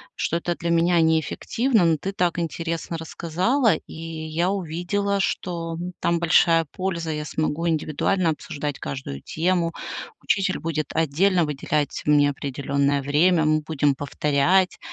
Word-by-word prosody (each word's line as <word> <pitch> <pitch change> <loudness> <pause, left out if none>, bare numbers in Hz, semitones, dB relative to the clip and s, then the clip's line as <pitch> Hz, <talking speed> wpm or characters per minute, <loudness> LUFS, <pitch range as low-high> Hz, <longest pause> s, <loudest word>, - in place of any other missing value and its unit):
что 170 - -1
это 175 0 -2
для 170 0 -2
меня 170 +1 +3
неэффективно. 180 - +1
Но 165 -1 +3
ты 190 +6 -4
так 175 -3 0
интересно 165 0 -3
рассказала, 180 - +1
и - - -11
я 165 +1 -3
увидела, 200 +2 -1
что 170 -3 -2 0.2
там 170 0 +1
большая 165 0 +4
польза: 170 -4 -3
я 150 -1 -3
смогу 155 +2 -1
индивидуально 160 +3 0
обсуждать 150 -2 -5
каждую 70 - -6
тему, 170 0 0 0.5
учитель 195 -1 0
будет 155 -2 -2
отдельно 165 +3 +2
выделять 150 0 -2
мне 145 -1 +4
определённое 140 0 -1
время, 160 +4 +3
мы 155 0 +2
будем 150 -2 +1
повторять 150 +6 +1
165 Hz, 135 wpm, -24 LUFS, 150-175 Hz, 0.5 s, большая